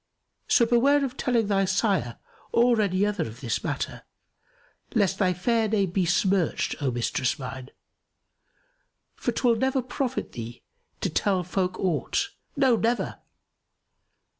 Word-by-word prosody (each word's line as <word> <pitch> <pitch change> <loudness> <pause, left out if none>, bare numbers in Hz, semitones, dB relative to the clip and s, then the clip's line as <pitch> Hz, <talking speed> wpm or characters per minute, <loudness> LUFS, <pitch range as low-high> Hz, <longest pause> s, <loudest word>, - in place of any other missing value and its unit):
So 235 - +5
beware 275 +5 +3
of 255 -1 -6
telling 240 -4 +1
thy 195 -1 +2
sire 190 - 0 0.3
or 235 -1 +4
any 195 -1 +1
other 210 - -1
of 115 +2 -10
this 120 -5 -2
matter, - - -3 0.9
lest 195 -3 +2
thy 185 -2 +3
fair 220 +5 +1
fame 200 -4 +1
be 185 0 +1
smirched, 185 0 +1
O 140 - +1
mistress 125 +3 -1
mine, 130 -1 -7 1.4
for - - -2
'twill 235 -3 +2
never 265 +2 +1
profit 255 +1 -3
thee 115 0 -8 0.4
to - - -1
tell 190 -3 +1
folk 180 +1 -2
aught; 190 - 0 0.3
no, 265 -4 +4
never! 230 +2 -1
200 Hz, 135 wpm, -26 LUFS, 175-235 Hz, 1.4 s, So